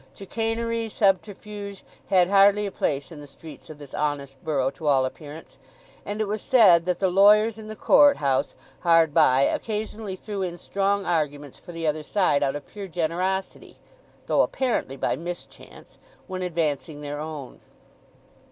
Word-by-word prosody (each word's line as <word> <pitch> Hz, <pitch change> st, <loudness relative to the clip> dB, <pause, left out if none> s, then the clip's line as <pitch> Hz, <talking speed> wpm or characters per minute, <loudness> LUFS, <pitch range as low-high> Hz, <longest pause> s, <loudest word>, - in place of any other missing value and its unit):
Chicanery, 225 Hz, +2 st, -2 dB
subterfuge, 200 Hz, 0 st, -2 dB, 0.3 s
had 180 Hz, -2 st, +4 dB
hardly 200 Hz, +1 st, +4 dB
a 200 Hz, -, -4 dB
place 140 Hz, -6 st, -2 dB
in 155 Hz, -3 st, -10 dB
the 145 Hz, -, -11 dB
streets 155 Hz, +3 st, -13 dB
of 155 Hz, -, -10 dB
this 145 Hz, -2 st, -13 dB
honest 140 Hz, -3 st, -3 dB
borough 135 Hz, -4 st, 0 dB
to 150 Hz, +3 st, -7 dB
all 135 Hz, -2 st, +4 dB
appearance; 150 Hz, +4 st, -9 dB, 0.5 s
and 205 Hz, +1 st, -4 dB
it 215 Hz, -, 0 dB
was 210 Hz, +1 st, -3 dB
said 190 Hz, -10 st, +5 dB
that 180 Hz, -1 st, 0 dB
the 190 Hz, -, +1 dB
lawyers 210 Hz, +4 st, +4 dB
in 215 Hz, -, -10 dB
the 215 Hz, -, -7 dB
Court 285 Hz, +5 st, +5 dB
House 135 Hz, -2 st, 0 dB, 0.2 s
hard 165 Hz, -2 st, +3 dB
by 135 Hz, -5 st, +4 dB
occasionally 215 Hz, +1 st, -3 dB
threw 200 Hz, +1 st, -6 dB
in 175 Hz, -2 st, -3 dB
strong 200 Hz, +2 st, -1 dB
arguments 145 Hz, -4 st, -2 dB
for -, -, -12 dB
the 165 Hz, -1 st, -5 dB
other 155 Hz, 0 st, 0 dB
side 150 Hz, -3 st, +1 dB
out 140 Hz, -1 st, 0 dB
of 145 Hz, -, -7 dB
pure 200 Hz, -2 st, -9 dB
generosity 180 Hz, +3 st, -3 dB, 0.5 s
(though -, -, +3 dB
apparently 235 Hz, -, -1 dB
by -, -, 0 dB
mischance) 175 Hz, +2 st, -10 dB, 0.3 s
when 185 Hz, -1 st, -6 dB
advancing 155 Hz, -4 st, -2 dB
their 145 Hz, 0 st, -5 dB
own. 150 Hz, -4 st, -7 dB
175 Hz, 160 wpm, -24 LUFS, 150-205 Hz, 0.5 s, said